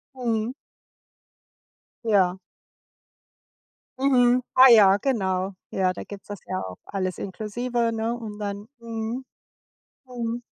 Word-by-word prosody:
Mhm. 230 -2 -1 1.5
Ja. 190 -4 +3 1.6
Mhm, 250 -2 +4
ah 260 +1 +9
ja, 200 -3 +7
genau. 195 -6 -1 0.2
Ja, 185 -1 +1
da - - -7
gibt's 200 -1 -11
das 205 -2 -7
ja 185 - -2
auch 90 -1 -7
alles 185 -2 -3
inklusive, 230 +4 -2
ne, 225 +1 -1
und 215 -3 -8
dann 205 0 -5
mhm, 230 +2 -4 0.8
mhm. 240 -2 -4
220 Hz, 110 wpm, -25 LUFS, 195-240 Hz, 1.6 s, ah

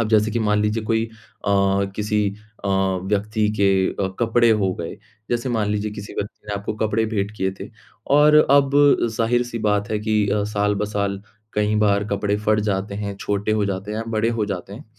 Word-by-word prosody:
अब 115 - 0
जैसे 110 0 +3
कि 115 - -1
मान 105 -2 +1
लीजिए 105 +1 0
कोई 110 0 +1
अ, 100 -3 -1
किसी 105 -1 0 0.4
अ, - - -1
व्यक्ति 100 +3 0
के 100 0 +4 0.4
अ, - - 0
कपड़े 120 0 +3
हो 100 -4 +2
गए। 85 -1 -6 0.3
जैसे 120 +1 -1
मान 110 -4 0
लीजिए 105 0 -1
किसी 105 -1 -8
व्यक्ति 105 +1 -6
ने 105 - -2
आपको 100 +1 -3
कपड़े 110 +1 0
भेंट 105 -2 -2
किए 95 -1 0
थे, - - -6 0.4
और 150 +2 +5 0.2
अब 140 -1 +5 0.5
ज़ाहिर-सी 120 +1 0
बात 105 -1 0
है 105 - 0
कि 105 -1 +1
अ, 105 +1 +1
साल-ब-साल 105 -1 -1 0.3
कई 105 0 +1
बार 105 -1 +2
कपड़े 100 0 0
फट 105 0 +3
जाते 100 0 -1
हैं, 100 -1 -4
छोटे 100 +1 -1
हो 105 -1 +1
जाते 100 +1 -3
हैं 105 - -3
या 115 - -3
बड़े 110 +1 +1
हो - - +2
जाते 95 -1 -5
हैं। 120 +8 -9
105 Hz, 195 wpm, -22 LUFS, 100-110 Hz, 0.5 s, और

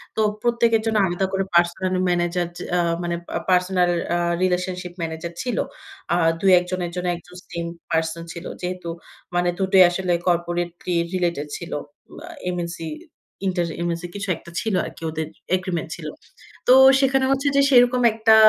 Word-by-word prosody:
তো 220 - +1 0.2
প্রত্যেকের 235 -2 +3
জন্য 220 -1 +1
আলাদা 175 +2 0
করে 195 0 +1
পার্সোনাল 175 +2 +2
ম্যানেজার, 175 0 +1
যে - - -6
আ - - +2 0.2
মানে 170 0 -1
পা - - -6
পার্সোনাল 180 -1 +3 0.3
আ - - +2 0.3
রিলেশনশিপ 180 -1 -1
ম্যানেজার 165 +1 -4
ছিল। 250 -1 -2 0.6
আ - - +4 0.3
২-১ 185 -2 +6
জনের 180 -2 -2
জন্য 180 0 -2
১ 170 - -10
জন 180 0 -13
সেম 170 0 -3 0.3
পারসন 160 0 0
ছিল। 170 0 -8 0.2
যেহেতু 180 -1 -4 0.5
মানে 175 0 +2
দুটোই 190 -1 +6
আসলে 180 0 -1
কর্পোরেটলি 175 0 -1 0.2
রিলেটেড 170 -5 -1
ছিল। 170 +1 -9 0.5
আ - - -13 0.2
এমএনসি 170 -2 -4 0.6
ইন্টারএমএসি 170 -1 -2
কিছু 200 0 -4
একটা 170 - -14
ছিল 215 +4 -2
আরকি - - -10
ওদের 160 0 -3 0.3
এগ্রিমেন্ট 180 -4 -3
ছিল। 160 -3 -8 0.6
তো 250 - +8 0.3
সেখানে 270 -1 +3
হচ্ছে 275 +1 +1
যে 280 - +6
সেরকম 250 -1 +5
একটা 220 0 +5
180 Hz, 155 wpm, -23 LUFS, 170-190 Hz, 0.6 s, তো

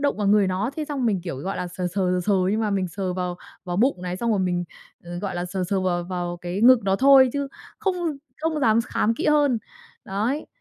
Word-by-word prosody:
động 285 0 +1
vào 210 - -1
người 205 -1 +4
nó, 190 +7 -1
thế 310 - -2
xong 280 -5 -2
mình 195 -5 +1
kiểu, 170 -6 -5
gọi 190 +7 -4
là, 180 - -3
sờ 180 +1 -4
sờ, 175 - -14 0.2
sờ 180 0 +1
sờ 210 - +3 0.2
nhưng 215 +2 0
mà 215 -2 0
mình 190 -2 0
sờ 185 +1 -3
vào 180 -1 -3 0.3
vào 175 -1 -3
bụng 225 -4 +2
này, 180 0 -3
xong 235 +4 -1
rồi 210 - +2
mình, 180 -1 0 0.4
ờ, 175 0 -6
gọi 190 -1 -4
là, 175 - -2
sờ 180 +1 -3
sờ 195 -1 +1
vào 180 -2 0
vào 175 -1 -3
cái 175 +3 -4
ngực 255 0 +7
nó 195 0 +2
thôi, 265 0 +6
chứ 280 -1 -2 0.3
không 390 -4 0 0.4
không 315 -1 -1
dám 225 -3 +4
khám 225 -1 +1
kỹ - - -3
hơn, 290 -5 +3 0.5
đấy. 220 +10 -2
195 Hz, 250 wpm, -24 LUFS, 180-255 Hz, 0.5 s, ngực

